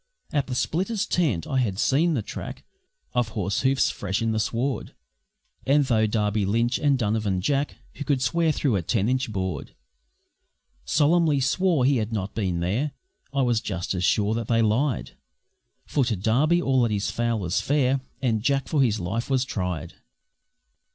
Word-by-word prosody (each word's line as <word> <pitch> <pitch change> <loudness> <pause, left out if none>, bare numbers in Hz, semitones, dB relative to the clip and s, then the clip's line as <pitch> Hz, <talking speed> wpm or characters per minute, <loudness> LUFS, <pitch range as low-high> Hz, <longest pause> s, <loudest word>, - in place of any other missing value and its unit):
At 145 -3 +1
the 130 - -3
splitters' 195 - -1
tent 140 - 0
I 135 - 0
had 105 -7 0
seen 155 - +2
the 115 - -1
track - - -7 0.5
Of 120 -2 +1
horse 100 -3 -1
hoofs 135 0 +2
fresh 95 +2 -3
on 115 - +1
the 110 - 0
sward, 125 +5 -2 0.7
And 145 +2 +3
though 110 -4 +2
Darby 105 -1 0
Lynch 115 +5 +1
and 145 -2 +3
Donovan 105 -4 0
Jack 140 +8 0 0.2
(Who 145 - -6
could 140 -2 +1
swear 165 +5 +2
through 135 -8 +1
a - - -1
ten 100 +4 0
inch 130 0 0
board) 95 -3 -4 1.1
Solemnly 150 - +3
swore 155 +1 +2
he 135 0 +3
had 110 0 -2
not 100 -3 -3
been 90 -6 -1
there, 115 +12 -1 0.4
I 140 -1 +1
was 120 -3 +1
just 90 -3 -3
as 90 -1 -2
sure 105 +4 +2
that 115 -1 -3
they 115 -1 +3
lied, 120 +5 0 0.7
For 140 - +1
to 120 -2 0
Darby 130 - +2
all 130 -1 +2
that 115 -2 +2
is 100 -1 -1
foul 120 -1 0
was 90 -1 -1
fair, 135 -2 +1 0.2
And 115 -4 +1
Jack 135 +3 +1
for 150 -4 +1
his 110 -5 +2
life 100 +8 -3
was 130 -1 +2
tried. 90 - -3
120 Hz, 180 wpm, -25 LUFS, 105-140 Hz, 1.1 s, And